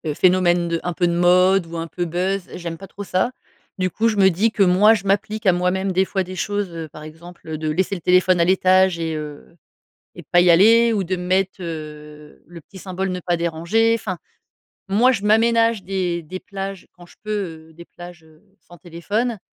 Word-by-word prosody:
phénomènes 175 Hz, -2 st, +2 dB
de 165 Hz, 0 st, -1 dB
un 180 Hz, -, -3 dB
peu 175 Hz, -1 st, 0 dB
de 170 Hz, -, 0 dB
mode 180 Hz, +1 st, +3 dB
ou 165 Hz, 0 st, -7 dB
un 165 Hz, -, -3 dB
peu 175 Hz, +1 st, -4 dB
buzz, 185 Hz, +3 st, -2 dB
j'aime 170 Hz, -2 st, -6 dB
pas 195 Hz, -, -11 dB
trop 205 Hz, +2 st, -9 dB
ça. 190 Hz, +6 st, -1 dB, 0.5 s
Du 185 Hz, 0 st, 0 dB
coup, 225 Hz, +1 st, 0 dB
je 215 Hz, -2 st, -1 dB
me 190 Hz, -1 st, +5 dB
dis 210 Hz, +6 st, +1 dB
que 205 Hz, -3 st, +2 dB
moi, 195 Hz, +5 st, +5 dB
je 200 Hz, -1 st, -6 dB
m'applique 210 Hz, +2 st, -1 dB
à 185 Hz, -, +5 dB
moi-même 185 Hz, +2 st, -1 dB
des 190 Hz, +1 st, +2 dB
fois 190 Hz, 0 st, -2 dB
des 185 Hz, +1 st, -9 dB
choses, 205 Hz, +1 st, -2 dB
heu, 165 Hz, -1 st, -6 dB
par 155 Hz, +1 st, -12 dB
exemple, 165 Hz, +2 st, -13 dB
heu, 155 Hz, -1 st, -4 dB
de 155 Hz, -1 st, -3 dB
laisser 190 Hz, +5 st, -1 dB
le 175 Hz, -, -8 dB
téléphone 180 Hz, 0 st, +3 dB
à 170 Hz, -, +3 dB
l'étage 185 Hz, -1 st, +3 dB
et 160 Hz, -1 st, -3 dB
heu 150 Hz, +1 st, -9 dB, 0.6 s
et -, -, -8 dB
pas 175 Hz, -, +6 dB
y 175 Hz, -1 st, +4 dB
aller, 225 Hz, +6 st, +5 dB
ou 195 Hz, -2 st, -1 dB
de 185 Hz, +2 st, -2 dB
me 180 Hz, 0 st, -6 dB
mettre, 190 Hz, +1 st, 0 dB
heu, 150 Hz, -2 st, -9 dB
le 170 Hz, -1 st, -12 dB
petit 190 Hz, -, -15 dB
symbole 190 Hz, 0 st, -4 dB
ne 180 Hz, 0 st, -4 dB
pas 175 Hz, 0 st, -1 dB
déranger 170 Hz, +8 st, +1 dB
enfin, 200 Hz, -5 st, -4 dB, 0.7 s
moi, 230 Hz, +6 st, +4 dB
je 210 Hz, -5 st, -2 dB
m'aménage 230 Hz, 0 st, +2 dB
des 180 Hz, -2 st, -2 dB
des 185 Hz, +4 st, -8 dB
plages 195 Hz, -1 st, -7 dB
quand 175 Hz, -1 st, -16 dB
je -, -, -21 dB
peux, 215 Hz, -, -6 dB, 0.4 s
heu, -, -, -18 dB
des 170 Hz, +2 st, -13 dB
plages, 175 Hz, -2 st, -13 dB
heu, 155 Hz, 0 st, -22 dB, 0.2 s
sans 175 Hz, -1 st, -17 dB
téléphone 205 Hz, +8 st, -3 dB
180 Hz, 220 wpm, -20 LUFS, 170-195 Hz, 0.7 s, pas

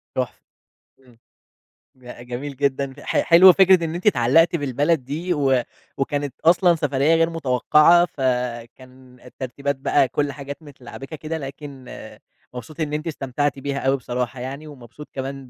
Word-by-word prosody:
تحفة، 130 Hz, -1 st, -3 dB, 0.6 s
إمم. 125 Hz, -3 st, -23 dB, 0.8 s
ج 125 Hz, -1 st, -12 dB
جميل 135 Hz, +3 st, -6 dB
جدًا، 140 Hz, -1 st, -1 dB
ح -, -, -1 dB
حلوة 180 Hz, +2 st, +8 dB
فكرة 185 Hz, -2 st, +5 dB
إن 165 Hz, +1 st, -3 dB
أنتِ 180 Hz, -, -3 dB
اتعلّقتِ 165 Hz, -, +4 dB
بالبلد 145 Hz, +1 st, 0 dB
دي 165 Hz, +7 st, -3 dB
و 135 Hz, -4 st, +2 dB, 0.4 s
وكانت 140 Hz, -1 st, -2 dB
أصلًا 175 Hz, +1 st, +5 dB
سفرية 150 Hz, 0 st, +1 dB
غير 165 Hz, 0 st, +2 dB
متوقعة، 160 Hz, +3 st, +4 dB
فكان 125 Hz, -1 st, -5 dB
الترتيبات 135 Hz, +3 st, -5 dB
بقى 135 Hz, 0 st, +1 dB
كل 145 Hz, +2 st, -2 dB
حاجات 140 Hz, +2 st, -9 dB
متلعبِكة 135 Hz, 0 st, -10 dB
كده، 160 Hz, +1 st, -5 dB
لكن 135 Hz, -2 st, -9 dB, 0.7 s
مبسوط 125 Hz, +5 st, -10 dB
إن 150 Hz, -2 st, -2 dB
أنتِ 150 Hz, +2 st, -3 dB
استمتعتِ 145 Hz, -2 st, -2 dB
بيها 140 Hz, 0 st, -3 dB
أوي 135 Hz, +1 st, +1 dB
بصراحة 125 Hz, 0 st, -4 dB
يعني 135 Hz, +5 st, -7 dB
ومبسوط 140 Hz, 0 st, -12 dB
كمان 135 Hz, -1 st, -6 dB
140 Hz, 145 wpm, -22 LUFS, 130-155 Hz, 0.8 s, حلوة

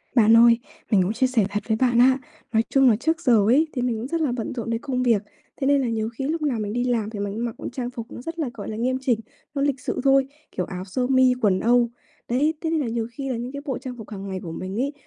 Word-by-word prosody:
Bạn 225 Hz, -1 st, +6 dB
ơi, 235 Hz, 0 st, +7 dB, 0.3 s
mình 200 Hz, -4 st, +5 dB
cũng 195 Hz, -, -1 dB
chia 255 Hz, +3 st, +2 dB
sẻ 235 Hz, -6 st, +2 dB
thật 205 Hz, +1 st, -3 dB
với 220 Hz, -, +1 dB
bạn 240 Hz, -1 st, +3 dB
á, 260 Hz, +1 st, +6 dB, 0.4 s
nói 225 Hz, 0 st, +4 dB
chung 270 Hz, -2 st, +5 dB
là 225 Hz, -, +4 dB
trước 320 Hz, +9 st, -1 dB
giờ 235 Hz, -9 st, +4 dB
ấy 295 Hz, +7 st, +4 dB
thì 250 Hz, -, -2 dB
mình 245 Hz, -2 st, 0 dB
cũng 235 Hz, -, -4 dB
rất 330 Hz, +3 st, -1 dB
là 295 Hz, -5 st, +1 dB
bận 240 Hz, -3 st, -3 dB
rộn 235 Hz, -2 st, -4 dB
đến 230 Hz, 0 st, -1 dB
công 255 Hz, -3 st, -1 dB
việc, 230 Hz, -5 st, +3 dB, 0.4 s
thế 270 Hz, -, -1 dB
nên 280 Hz, -1 st, +4 dB
là 255 Hz, -, 0 dB
nhiều 220 Hz, -1 st, -1 dB
khi 235 Hz, +4 st, -5 dB
lúc 320 Hz, +2 st, -1 dB
nào 275 Hz, -7 st, 0 dB
mình 210 Hz, -1 st, -3 dB
đi 245 Hz, +1 st, 0 dB
làm 235 Hz, -4 st, 0 dB
thì 215 Hz, -2 st, -7 dB
mình 200 Hz, 0 st, -2 dB
cũng 230 Hz, +2 st, -2 dB
mặc 230 Hz, -, -4 dB, 0.2 s
trang 245 Hz, -2 st, -3 dB
phục 235 Hz, -2 st, -8 dB
nó -, -, -8 dB
rất 330 Hz, +5 st, -6 dB
là, 295 Hz, -5 st, -1 dB
gọi 205 Hz, -, -7 dB
là, 215 Hz, -, -4 dB
nghiêm 255 Hz, +3 st, 0 dB
chỉnh, 245 Hz, -4 st, +1 dB, 0.4 s
nó 280 Hz, -, 0 dB
lịch 280 Hz, -2 st, +1 dB
sự -, -, -3 dB
thôi, 270 Hz, -1 st, +4 dB, 0.2 s
kiểu 180 Hz, -, -2 dB
áo 185 Hz, 0 st, -6 dB
sơ 250 Hz, +6 st, -1 dB
mi, 260 Hz, -1 st, +5 dB
quần 195 Hz, -3 st, +3 dB
âu. 240 Hz, +2 st, +3 dB, 0.4 s
Đấy, 285 Hz, +6 st, +2 dB
thế 325 Hz, -, -1 dB
nên 325 Hz, -1 st, +1 dB
là 280 Hz, -, -1 dB
nhiều 230 Hz, 0 st, -2 dB
khi 270 Hz, +3 st, -5 dB
là 250 Hz, -, -1 dB
những 240 Hz, +2 st, -5 dB
cái 280 Hz, +1 st, -6 dB
bộ 265 Hz, -5 st, -2 dB
trang 255 Hz, -2 st, -7 dB
phục 220 Hz, -3 st, -10 dB
hàng 200 Hz, -2 st, -7 dB
ngày 190 Hz, -1 st, -4 dB
của 165 Hz, -, -6 dB
mình 185 Hz, +4 st, -5 dB
ấy, 280 Hz, +2 st, -1 dB
245 Hz, 305 wpm, -24 LUFS, 220-265 Hz, 0.4 s, ơi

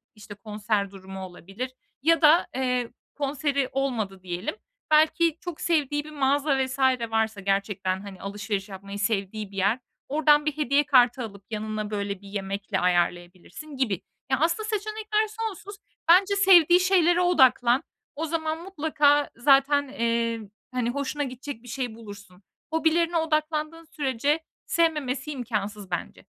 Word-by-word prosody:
işte, 205 Hz, -1 st, -11 dB
konser 210 Hz, -1 st, -2 dB
durumu 190 Hz, 0 st, -9 dB
olabilir 195 Hz, +8 st, -7 dB, 0.3 s
ya 330 Hz, +4 st, +3 dB
da, 310 Hz, +3 st, +6 dB
eee, 250 Hz, -2 st, -1 dB, 0.2 s
konseri 280 Hz, -1 st, -1 dB
olmadı 225 Hz, -8 st, -2 dB
diyelim. 180 Hz, -, -4 dB, 0.4 s
Belki 320 Hz, +1 st, +4 dB
çok 350 Hz, -3 st, -7 dB
sevdiği 295 Hz, -3 st, +1 dB
bir 305 Hz, -, -11 dB
mağaza 280 Hz, 0 st, +1 dB
vs. 260 Hz, +1 st, -7 dB, 0.3 s
varsa 220 Hz, -2 st, 0 dB
gerçekten, 195 Hz, -1 st, -1 dB
hani, 195 Hz, -2 st, -10 dB
alışveriş 200 Hz, 0 st, -4 dB
yapmayı 200 Hz, +1 st, -8 dB
sevdiği 210 Hz, -1 st, -2 dB
bir 195 Hz, -, -11 dB
yer, 200 Hz, +6 st, +2 dB, 0.3 s
oradan 295 Hz, 0 st, +4 dB
bir 305 Hz, -1 st, -1 dB
hediye 290 Hz, 0 st, +2 dB
kartı 250 Hz, -3 st, +4 dB
alıp 200 Hz, -3 st, -9 dB
yanına, 215 Hz, -1 st, -3 dB
böyle, 200 Hz, -1 st, -3 dB
bir 200 Hz, -, -13 dB
yemekle 195 Hz, 0 st, -3 dB
ayarlayabilirsin 180 Hz, -, -2 dB
gibi. 215 Hz, -9 st, 0 dB, 0.3 s
Ya, 265 Hz, -, +2 dB
aslında 340 Hz, +8 st, 0 dB
seçenekler 430 Hz, +1 st, -1 dB
sonsuz. 425 Hz, -2 st, -6 dB, 0.3 s
Bence 390 Hz, +3 st, +6 dB
sevdiği 360 Hz, -3 st, +6 dB
şeylere 360 Hz, -2 st, +3 dB
odaklan. 265 Hz, -6 st, +4 dB, 0.3 s
O 315 Hz, +3 st, -2 dB
zaman 320 Hz, 0 st, -2 dB
mutlaka 295 Hz, -5 st, +2 dB
zaten, 275 Hz, +3 st, +4 dB
eee, 230 Hz, -3 st, -1 dB, 0.3 s
hani, 250 Hz, -2 st, -1 dB
hoşuna 280 Hz, +3 st, -2 dB
gidecek 255 Hz, -1 st, -7 dB
bir 245 Hz, -, -14 dB
şey 245 Hz, -2 st, -4 dB
bulursun. 200 Hz, -4 st, -12 dB, 0.3 s
Hobilerine 330 Hz, +1 st, +2 dB
odaklandığın 310 Hz, 0 st, -1 dB
sürece 290 Hz, -1 st, 0 dB, 0.3 s
sevmemesi 300 Hz, -4 st, 0 dB
imkânsız 210 Hz, -6 st, -4 dB
bence. 175 Hz, -, -5 dB
260 Hz, 135 wpm, -26 LUFS, 205-310 Hz, 0.4 s, da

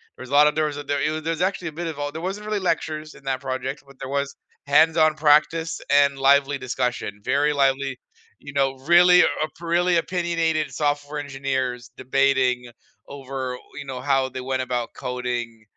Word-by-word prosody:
There -, -, -10 dB
was 130 Hz, -, -11 dB
a -, -, -6 dB
lot 150 Hz, +1 st, +6 dB
there 155 Hz, 0 st, +2 dB
was 145 Hz, -1 st, -3 dB
a 145 Hz, -, -5 dB
there 145 Hz, 0 st, -1 dB
it -, -, +1 dB
w 155 Hz, 0 st, -2 dB
there 165 Hz, +1 st, -1 dB
was -, -, -5 dB
actually 185 Hz, -2 st, -1 dB
a -, -, -11 dB
bit 175 Hz, -, -2 dB
of 160 Hz, -, -5 dB
all 145 Hz, 0 st, -3 dB
there 160 Hz, +2 st, -7 dB
wasn't 205 Hz, +2 st, -5 dB
really 215 Hz, -1 st, -1 dB
lectures 155 Hz, -1 st, -5 dB
in -, -, -16 dB
that 130 Hz, -1 st, -2 dB
project, 135 Hz, +1 st, -4 dB
but 140 Hz, -, -17 dB
there 130 Hz, -, -6 dB
was 140 Hz, 0 st, -2 dB, 0.3 s
hands-on 155 Hz, +1 st, +4 dB
practice 155 Hz, +2 st, +2 dB
and 140 Hz, -1 st, +4 dB
lively 140 Hz, +1 st, +4 dB
discussion, 125 Hz, -5 st, -3 dB
very 145 Hz, +4 st, +2 dB
lively, 135 Hz, -1 st, +1 dB, 0.4 s
you 140 Hz, -, -10 dB
know, 135 Hz, -1 st, +1 dB, 0.2 s
really 180 Hz, 0 st, +7 dB
op 155 Hz, -1 st, -1 dB
really 175 Hz, +1 st, +2 dB
opinionated 165 Hz, -3 st, 0 dB
software 145 Hz, 0 st, -1 dB
engineers 130 Hz, -4 st, -3 dB
debating 130 Hz, -2 st, +1 dB, 0.4 s
over, 135 Hz, -2 st, -5 dB, 0.2 s
you 145 Hz, -, -6 dB
know, 130 Hz, -2 st, -6 dB
how 135 Hz, -1 st, +1 dB
they 130 Hz, 0 st, -6 dB
went 130 Hz, 0 st, -2 dB
about 120 Hz, -2 st, -3 dB
coding 120 Hz, -3 st, -4 dB
140 Hz, 195 wpm, -23 LUFS, 130-155 Hz, 0.4 s, really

